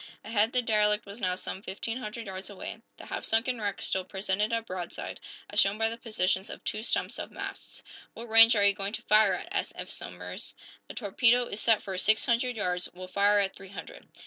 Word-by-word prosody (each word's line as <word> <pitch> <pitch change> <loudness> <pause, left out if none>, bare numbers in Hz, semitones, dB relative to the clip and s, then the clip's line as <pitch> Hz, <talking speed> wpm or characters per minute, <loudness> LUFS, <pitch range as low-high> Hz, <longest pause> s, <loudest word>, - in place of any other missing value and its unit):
Ahead, 220 0 +2
the 250 -2 +1
derelict 210 -2 +3
was 200 +3 -9
now 185 -1 +1
some 190 +1 -6
fifteen 225 +4 -4
hundred 225 0 -6
yards 190 0 -6
away. 200 - -7 0.2
The - - -10
half - - -5
sunken 230 +1 0
wreck 205 -1 -2
still 190 - 0
presented 195 +3 -1
a 230 0 0
broadside, 185 -5 -6 0.3
as - - 0
shown 195 +2 +4
by 225 0 +2
the 230 - -5
positions 190 -4 0
of - - -9
two 215 - -2
stumps 230 - 0
of - - -5
masts. - - -7 0.3
"What 235 - -7
range 225 +1 +8
are 205 - +3
you 200 - +5
going 195 +2 -3
to - - -4
fire 215 -1 +5
at?" - - -7
asked - - -1
Eph - - -5
Somers. - - -7 0.3
"The - - -9
torpedo 240 +3 +3
is 210 - -4
set 225 -2 +3
for 190 - -4
six 215 +3 +4
hundred 245 +1 +1
yards; 180 -4 -1
we'll 185 0 -8
fire 205 +2 +4
at 195 -1 -2
three 195 -1 -11
hundred." 180 -4 -9
210 Hz, 220 wpm, -29 LUFS, 195-225 Hz, 0.3 s, range